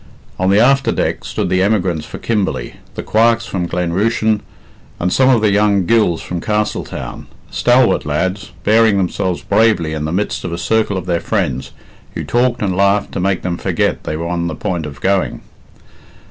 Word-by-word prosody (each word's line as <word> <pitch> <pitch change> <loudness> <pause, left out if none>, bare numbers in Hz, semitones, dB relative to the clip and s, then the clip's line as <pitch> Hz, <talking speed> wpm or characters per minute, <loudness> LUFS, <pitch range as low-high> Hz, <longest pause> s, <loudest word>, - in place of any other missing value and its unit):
On 95 +1 +2
the 100 +2 +4
after 135 +4 +4
deck - - -1
stood - - -3
the 95 0 +2
emigrants 95 -6 0
for - - -7
Kimberley, 105 -4 -2 0.2
the - - -5
Quarks 115 +1 +2
from 90 -3 -3
Glen 90 -1 -2
Rushen, 110 +2 +1 0.6
and 90 +1 0
some 130 0 +4
of 120 -4 +4
the 105 -2 +3
young 100 -2 +2
Gills 105 -6 +2
from 90 -2 -4
Castletown 105 0 -3 0.2
stalwart 125 0 +3
lads, 90 +7 -2
bearing 110 -1 +4
themselves 95 -1 -1
bravely 100 -6 +2
in 75 -1 -3
the 80 - -2
midst 100 +5 -2
of - - -4
a 85 - -3
circle 100 +3 0
of 90 - -5
their 85 -2 0
friends, 85 - -1 0.5
who - - -3
talked 120 -1 +1
and 95 -3 0
laughed 100 +1 +2
to - - -4
make 95 0 0
them 90 -2 -2
forget - - -1
they 75 - -3
were 85 - -4
on 85 0 -1
the 80 - -4
point 90 -7 -3
of 70 -1 -10
going. 95 0 0
95 Hz, 190 wpm, -17 LUFS, 85-110 Hz, 0.6 s, the